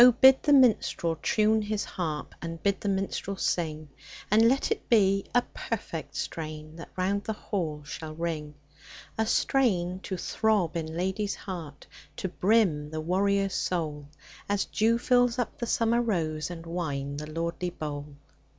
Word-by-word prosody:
BID 265 0 +8
the 290 - +3
minstrel 225 -10 +4
tune 220 0 +3
his 210 0 -2
haxp, 155 -4 -3
And 165 -1 -6
bid 200 -2 +1
the 205 - -1
minstrel 195 0 -2
sing; 155 -5 -1 0.4
And 225 +2 +6
let 275 - +1
it 445 - -2
be 195 -4 +4
a 245 - +5
perfect - - -5
strain 155 -1 -5
That 165 - -9
round 200 +2 0
the 220 - -1
hall 165 -8 -3
shall 155 0 -7
ring: 155 -3 -3 0.6
A 220 0 0
strain 185 -10 +2
to 190 -1 -5
throb 205 -3 +1
in 165 -2 -2
lad/s 190 +3 -1
heart, 165 -7 -7 0.3
To - - -2
brim 180 -7 +2
the 155 0 -4
warrior's 195 +3 +1
soul. 150 -5 -2 0.4
As 205 -1 +1
dew 225 +2 +2
fills 245 0 +3
up 245 - -2
the 235 - -2
summer 230 +1 +2
rose 160 -9 -1
And 170 -2 -7
wine 145 -5 -3
the 150 +1 -6
lordly 170 +2 -2
bowl 150 -4 -5
185 Hz, 155 wpm, -28 LUFS, 160-215 Hz, 0.6 s, BID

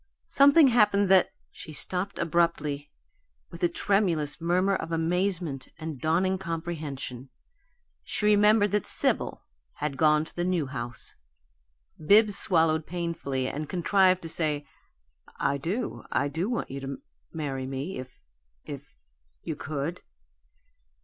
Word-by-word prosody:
Something 280 +1 +6
happened 205 -4 +3
that 190 -1 +5
" - - -43
She 155 - -10
stopped 185 +6 -1
abruptly, 155 -4 0 0.6
with 170 - -10
a 175 - +3
tremulous 170 -6 0
murmur 185 +3 +2
of 165 - -5
amazement 165 -4 -1
and 155 -4 -6
dawning 185 +4 +1
comprehension. 155 -7 -5 0.7
She 210 - -2
remembered 210 0 +4
that 210 -1 0
Sibyl - - -1 0.3
had 145 -2 -4
gone 155 -1 +3
to - - -14
the 175 - -1
New 180 -4 0
House. 120 -3 -5 0.9
Bibbs 205 +4 +6
swallowed 160 -4 +4
painfully 165 -7 -3
and 150 +2 -5
contrived 185 0 +3
to 165 - -5
say, 150 -3 -1 0.7
"I 140 0 0
do 200 - -3
I 140 - +1
do 165 +8 -2
want 240 - -3
you 135 - -5
to 135 0 -5 0.3
marry 135 -4 -4
me, 135 +7 -4
if 130 0 -10 0.5
if - - -9 0.5
you - - -4
could." 155 +4 -4
165 Hz, 130 wpm, -27 LUFS, 145-190 Hz, 0.9 s, Something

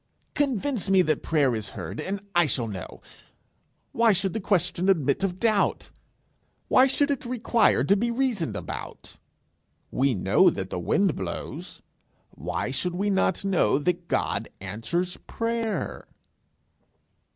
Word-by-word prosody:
Convince 270 -6 0
me 190 -1 +5
that 155 -1 0
prayer 145 -6 +2
is 110 -2 -3
heard, 85 -5 -6
and 195 +1 -4
I 175 -2 +4
shall 120 -2 0
know. 95 -5 -8 0.9
Why 230 -2 +4
should 190 -1 0
the - - -2
question 185 -2 +1
admit 155 -2 +2
of 185 -1 -1
doubt? 215 -2 +1 0.8
Why 260 - +6
should 285 +2 +2
it 280 - -2
require 235 -2 +2
to 200 - +4
be 235 +4 0
reasoned 235 -8 -1
about? - - -7 0.7
We 135 -1 +1
know 90 - +4
that - - -4
the - - -2
wind - - +1
blows: - - -6 0.5
why 85 - -4
should 175 +7 -2
we 200 +3 0
not 190 -1 +1
know 190 -7 +3
that 175 +3 -1
God - - -1
answers 115 - -3
prayer?' 230 -1 -3
190 Hz, 140 wpm, -26 LUFS, 145-225 Hz, 0.9 s, Why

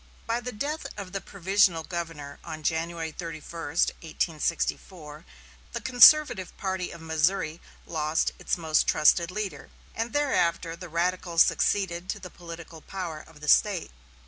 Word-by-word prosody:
By 230 +1 0
the 250 +1 -5
death 290 +8 -3
of 195 -3 -7
the 195 0 -3
provisional 190 -3 +2
governor 165 -5 -6
on 155 -1 -7
January 165 +1 -1
31, 165 -1 -8
1864, 160 0 -2 0.5
the - - -2
conservative 245 - +6
party 190 -2 -2
of 170 - -10
Missouri 160 +1 0 0.2
lost 155 -1 0
its - - -1
most 160 -2 +2
trusted 170 +2 +4
leader, 200 +1 -5 0.2
and 230 +1 -3
thereafter 175 - +1
the 180 0 -9
radicals 170 0 +2
succeeded 185 -2 0
to 210 - -2
the 180 -2 -10
political 165 -2 -10
power 175 -5 -5
of 160 -2 -17
the 150 - -7
State. 195 +2 +3
170 Hz, 140 wpm, -27 LUFS, 160-195 Hz, 0.5 s, conservative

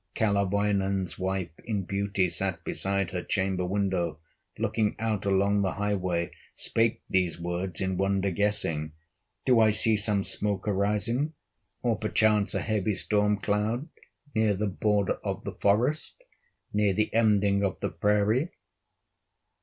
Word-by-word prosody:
Kalerwoinen's 100 -3 0
wife 95 -2 -2
in 105 -4 -2
beauty 100 0 0
Sat 90 -1 -1
beside 100 -1 0
her 90 -2 -3
chamber 95 -2 -1
window, 90 -4 -1 0.4
Looking 110 -2 0
out 110 -3 -2
along 100 +1 +2
the 95 -2 0
highway, 95 -4 -1 0.2
Spake 115 0 0
these 90 -3 +1
words 85 +1 -3
in 95 -1 -1
wonder 95 0 +1
guessing: 80 -6 0 0.5
"Do 125 -3 +5
I 110 -1 +5
see 110 +1 +5
some 105 -1 +2
smoke 100 0 +1
arising, 105 +9 0 0.5
Or 115 -3 +1
perchance 110 -1 +2
a - - 0
heavy 105 -2 0
storm 105 +1 +2
cloud, 105 - -1 0.4
Near 110 -3 +2
the 105 +3 -1
border 100 0 0
of - - -3
the - - -5
forest, 125 - 0 0.5
Near 105 -1 +2
the 105 +3 0
ending 105 -3 +3
of 95 - -1
the - - -2
prairie?" 105 - +1
100 Hz, 135 wpm, -27 LUFS, 95-105 Hz, 0.5 s, Do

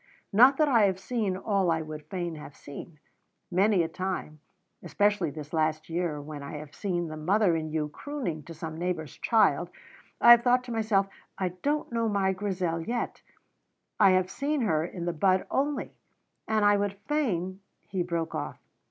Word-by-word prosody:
Not 255 +6 +7
that 305 - +4
I 230 -7 +5
have 190 -2 +1
seen 205 -3 -1
all 195 -2 +1
I 160 -1 +1
would 155 -1 -8
fain 175 -1 -3
have 150 -2 -10
seen. 150 +3 -10 0.5
Many 190 0 +3
a - - -1
time, 180 -3 -4 0.4
especially 205 -5 +1
this 150 +1 -9
last 155 0 0
year, 170 -3 -1
when 145 0 -7
I 140 - -7
have 150 -1 -8
seen 175 -4 -2
the 155 -1 -6
mother 180 +3 +2
in 155 -1 -2
you 155 -1 -1
crooning 205 - -5
to 165 - -8
some 160 0 -6
neighbour's 170 -4 -3
child, 195 - +3 0.5
I 235 - +8
have 240 0 +9
thought 250 +1 +3
to 250 - -8
myself, 215 -3 +2 0.3
'I 185 -2 0
don't 295 -1 -1
know 230 -1 0
my 195 -2 +1
Grizel 185 -4 -2
yet; 235 +8 -3 0.8
I 200 -2 +7
have 185 0 +1
seen 290 +4 -1
her 160 -9 +1
in 175 0 -5
the 175 - -1
bud 185 +3 +2
only,' 285 +2 -1 0.5
and 215 -1 +2
I 205 0 +5
would 200 -1 -1
fain 190 - -1
" - - -43
He 190 -2 0
broke 170 -2 -2
off. - - -4
185 Hz, 185 wpm, -28 LUFS, 160-215 Hz, 0.8 s, have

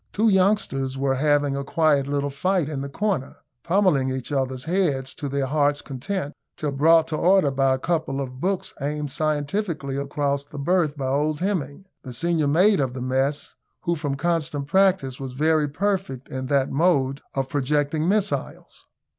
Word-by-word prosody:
Two 220 +2 +3
youngsters 185 -10 +1
were 135 0 +1
having 145 0 +2
a 140 - -2
quiet 145 -1 +2
little 140 0 -1
fight 180 +3 0
in 145 -3 -4
the 140 - -5
corner, 185 -3 -2 0.3
pummelling 170 -7 +2
each 130 +1 -4
other's 130 -2 -1
heads 145 -6 0
to 145 -3 -5
their 140 0 -1
hearts' 145 +1 +1
content, 145 +4 -4 0.2
till 150 -2 -2
brought 160 +4 +4
to 155 - -2
order 180 -3 +3
by 135 0 +2
a - - -4
couple 155 -2 -1
of 130 -2 -5
books 190 +1 -1
aimed 145 0 -2
scientifically 155 -1 -2
across 140 0 -1
the 145 +1 -12
berth 155 0 +1
by 135 - -3
old 145 +3 0
Hemming, 185 -3 -2 0.2
the 130 - -8
senior 165 +3 +1
mate 185 +7 +4
of 130 -2 -1
the 130 - -5
mess, 135 +3 -1 0.3
who, 170 - +1
from 145 -4 -2
constant 155 -2 -1
practice, 185 -6 +2
was 135 -2 -6
very 155 +2 +2
perfect 185 -5 -2
in 130 0 -4
that 140 -1 +1
mode 140 -3 +2
of 135 -1 -1
projecting 145 +4 0
missiles. 205 0 -2
145 Hz, 170 wpm, -24 LUFS, 135-170 Hz, 0.3 s, brought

